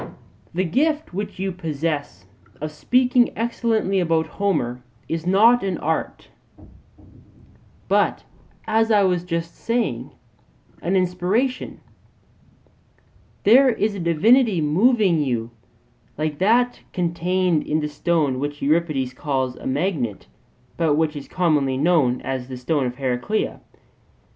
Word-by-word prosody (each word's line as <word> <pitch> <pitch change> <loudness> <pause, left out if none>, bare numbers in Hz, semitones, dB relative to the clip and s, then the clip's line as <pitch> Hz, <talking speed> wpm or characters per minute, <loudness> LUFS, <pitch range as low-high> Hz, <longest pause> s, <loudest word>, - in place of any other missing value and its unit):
The 180 +2 -1
gift 295 - 0
which 200 +2 -5
you 190 +1 -2
possess 150 - -4 0.3
of 155 +1 -4
speaking 250 +8 +2
excellently 225 -4 0
about 165 -2 +1
Homer 150 -13 -2 0.3
is 165 +1 -3
not 225 +6 +5
an 190 -3 -1
art, 160 +1 -3 1.6
but, - - +1 0.4
as 225 +1 +2
I 210 -2 +4
was 180 -2 +1
just 170 -1 -4
saying, 235 0 -2 0.7
an 180 +3 0
inspiration; 185 +8 -1 1.6
there 260 +6 +6
is 220 -3 0
a 200 - -6
divinity 195 - +3
moving 185 - +3
you, 120 -4 -2 0.7
like 150 -1 -2
that 240 +5 +2
contained 175 -1 0
in 155 - +1
the 150 - -2
stone 150 -3 0
which 145 +1 -4
Euripides 145 -4 0
calls 130 -2 -2
a - - -8
magnet, 135 - -2 0.5
but 160 -3 +2
which 155 0 0
is 145 - -7
commonly 150 -7 +1
known 145 -5 +2
as 130 -2 -4
the 130 -1 -7
stone 130 +1 0
of 125 - -5
Heraclea. 130 - -2
170 Hz, 120 wpm, -22 LUFS, 145-205 Hz, 1.6 s, there